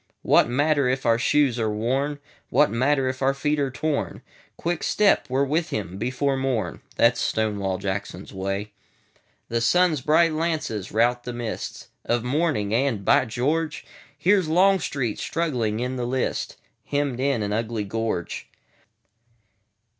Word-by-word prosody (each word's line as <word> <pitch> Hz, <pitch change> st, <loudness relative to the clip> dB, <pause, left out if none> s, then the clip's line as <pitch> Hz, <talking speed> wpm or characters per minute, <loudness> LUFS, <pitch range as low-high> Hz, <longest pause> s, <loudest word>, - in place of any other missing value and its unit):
What -, -, +4 dB
matter 145 Hz, +1 st, +2 dB
if 130 Hz, +1 st, -1 dB
our 115 Hz, 0 st, +3 dB
shoes 135 Hz, -2 st, +2 dB
are 110 Hz, -1 st, +1 dB
worn? 130 Hz, +7 st, -1 dB, 0.3 s
What 145 Hz, +4 st, +3 dB
matter 130 Hz, +3 st, +2 dB
if 130 Hz, 0 st, -3 dB
our 135 Hz, +1 st, +2 dB
feet 150 Hz, +2 st, 0 dB
are 140 Hz, -1 st, +1 dB
torn? 145 Hz, +3 st, -2 dB, 0.3 s
Quick 170 Hz, -1 st, -2 dB
step! 205 Hz, -8 st, +3 dB
we 130 Hz, -, -1 dB
're 140 Hz, -, +4 dB
with 160 Hz, +4 st, 0 dB
him 95 Hz, -2 st, -4 dB
before 130 Hz, +4 st, 0 dB
morn:That 115 Hz, -2 st, 0 dB
's -, -, -1 dB
Stonewall 100 Hz, -4 st, 0 dB
Jackson's 95 Hz, 0 st, -5 dB
Way.The 100 Hz, +4 st, -6 dB
sun's 165 Hz, +3 st, +3 dB
bright 155 Hz, +4 st, +3 dB
lances 155 Hz, -, -2 dB
rout 120 Hz, +2 st, +2 dB
the 125 Hz, -, -5 dB
mistsOf 120 Hz, 0 st, -4 dB
morning; 130 Hz, -6 st, 0 dB
and—By 125 Hz, +1 st, +2 dB
George! 150 Hz, +8 st, -1 dB, 0.3 s
Here 190 Hz, +7 st, +4 dB
's 170 Hz, -, -5 dB
Longstreet, 160 Hz, -, +2 dB
struggling 125 Hz, -10 st, -1 dB
in 125 Hz, +1 st, -2 dB
the 120 Hz, -1 st, -2 dB
lists, 130 Hz, +1 st, -2 dB, 0.3 s
Hemmed 140 Hz, -3 st, -1 dB
in 135 Hz, -4 st, +1 dB
an 105 Hz, 0 st, -2 dB
ugly 110 Hz, 0 st, -1 dB
gorge. 110 Hz, -4 st, -3 dB
130 Hz, 140 wpm, -24 LUFS, 110-145 Hz, 0.3 s, What